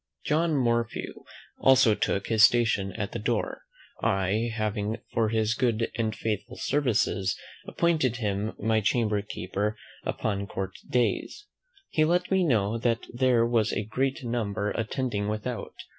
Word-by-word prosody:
John 160 +1 +2
Morphew 120 -3 -1 0.3
also 130 -4 +6
took 100 -1 -1
his 110 -2 +2
station 110 -4 +4
at 105 +1 -4
the 120 - -4
door; 115 0 -1 0.4
I 95 +4 +1
having, 110 0 -2 0.2
for 110 -2 +2
his 110 0 +1
good 120 -3 0
and 110 -1 -1
faithful 105 -3 -3
services, 105 -8 +1 0.3
appointed 155 -8 +1
him 105 -2 -2
my 110 +1 +1
chamber 105 -1 +1
keeper 100 +1 -3 0.3
upon 100 -2 -2
court 95 -1 -4 0.2
days. 125 - 0 0.4
He 155 - +2
let 175 +3 +1
me 190 -1 +4
know 115 - +1
that 115 -1 0
there 120 -2 +3
were 115 -2 +3
a - - -1
great 135 +5 -1
number 110 -4 -1
attending 115 -2 -2
without. 110 +3 -4
115 Hz, 140 wpm, -27 LUFS, 105-125 Hz, 0.4 s, also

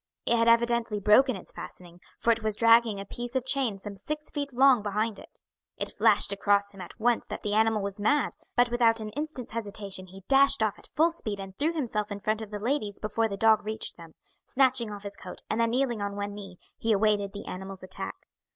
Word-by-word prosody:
It 235 - +4
had 230 0 +2
evidently 235 -2 +2
broken 215 +5 +5
its 190 - -8
fastening, 175 -1 -10 0.2
for 235 - +2
it 230 0 0
was 215 -1 -1
dragging 230 -2 +4
a 195 - -6
piece 240 +5 -7
of 255 -1 0
chain 260 -6 0
some 200 +1 -8
six 300 +10 -6
feet 285 -2 -3
long 260 -1 +5
behind 215 +1 -2
it. - - -14 0.4
It - - -4
flashed 200 - +3
across 200 0 +2
him 195 -2 -11
at 180 - -11
once 235 +1 +1
that - - -6
the 205 - -1
animal 220 -1 +2
was 200 +1 -5
mad, 285 +7 +2 0.2
but 245 0 +3
without 230 -1 +3
an 215 -1 -5
instant's 295 -1 -5
hesitation 200 -4 -6
he 190 +1 -13
dashed 275 -4 +5
off 215 -2 -1
at - - -16
full 325 +2 +3
speed 215 -11 -5
and 195 -1 -8
threw 310 - 0
himself 220 -9 -2
in 200 - -4
front 215 +2 -1
of 220 - -7
the 210 - -5
ladies 215 -2 -2
before 225 +1 0
the 200 -2 -5
dog 220 0 +4
reached 220 +1 -3
them. 165 -2 -14 0.3
Snatching 255 -4 +3
off 205 -1 -8
his 200 0 -7
coat, - - -10
and 225 - +1
then 230 - +2
kneeling 240 -2 0
on 200 0 -3
one 205 0 -4
knee, 195 -3 -10 0.2
he 225 - 0
awaited 205 -1 +2
the 200 - -8
animal's 190 0 -7
attack. 185 0 -5
215 Hz, 225 wpm, -28 LUFS, 200-240 Hz, 0.4 s, broken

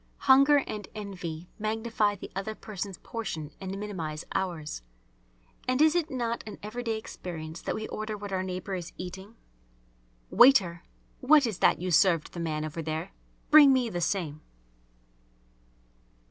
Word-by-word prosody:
Hunger 275 +1 +6
and 210 -2 -6
envy 180 -5 -6
magnify 215 -1 0
the 195 - -10
other 195 +3 -3
person's 200 -3 -6
portion 160 -10 -5
and 190 0 -4
minimise 170 -7 -5
ours. 170 - -3 0.9
And 255 +1 +1
is 310 0 +6
it 345 -2 0
not 235 -4 -2
an 210 - -7
everyday 225 +1 -3
experience 165 -6 -7
that - - -2
we 220 - -4
order 215 0 -4
what 205 -1 -7
our 185 - 0
neighbour 185 +1 -4
is 180 -2 -5
eating? 190 +4 -8 1.0
"Waiter, 190 -11 +6 0.4
what 290 +2 +5
is 215 -6 -3
that - - +4
you 180 +1 -2
served 170 -1 +3
the 175 - -6
man 155 -2 -2
over 155 +2 -5
there? 155 0 -4 0.4
Bring 295 -2 +9
me 255 -3 +2
the 175 - -3
same!" 160 -4 -1
195 Hz, 145 wpm, -28 LUFS, 170-230 Hz, 1.0 s, Bring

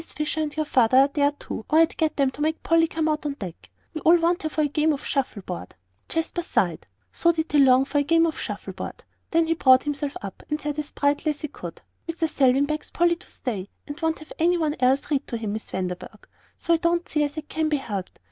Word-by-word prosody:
Fisher 305 +1 -3
and 300 0 -3
your 310 - +1
father 255 -3 +3
are 275 +1 +6
there, 285 0 +2
too, 255 - -7
or 310 - +3
I'd 325 0 +4
get 315 -1 0
them 275 -2 +2
to 290 - -9
make 315 +1 -1
Polly 330 0 +4
come 320 0 -1
out 305 -1 0
on 295 -2 -2
deck. 185 -9 -9 0.2
We 315 - -5
all 335 +2 +6
want 345 +1 +1
her 315 - -2
for 310 - -1
a 300 - +3
game 305 +2 +2
of 280 - -6
shuffle 255 -7 -2
board." 90 - -7 0.3
Jasper 325 +1 -1
sighed. 340 - -1 0.2
So 340 - +3
did 320 -1 -3
he 295 - +4
long 265 -1 +6
for 290 - 0
a - - +2
game 330 +3 +4
of 320 - -2
shuffle - - -5
board. - - -7 0.3
Then 330 0 +3
he 325 - +2
brought 260 -5 +5
himself 290 -1 -3
up, 195 -2 -7
and 300 0 -1
said 295 0 -3
as 295 - -4
brightly 290 +2 +1
as 295 - -3
he 300 - -4
could: - - -9 0.3
"Mr. 330 0 -1
Selwyn 275 -2 +3
begs 305 +1 -4
Polly 345 0 +2
to - - -17
stay, 205 -7 -5 0.2
and 290 +3 -8
won't 320 0 +1
have 310 - -12
any 350 +2 +3
one 310 -3 0
else 265 +4 +2
read 285 -1 0
to 235 - -3
him, 215 -2 -3
Miss 220 - -5
Vanderburgh, 185 - -5 0.3
so 340 - +1
I - - +4
don't 340 +1 0
see 300 - 0
as 290 +1 -3
it 305 -1 -5
can 315 -1 -1
be 300 - +2
helped. 205 -8 -6
300 Hz, 255 wpm, -24 LUFS, 270-320 Hz, 0.3 s, are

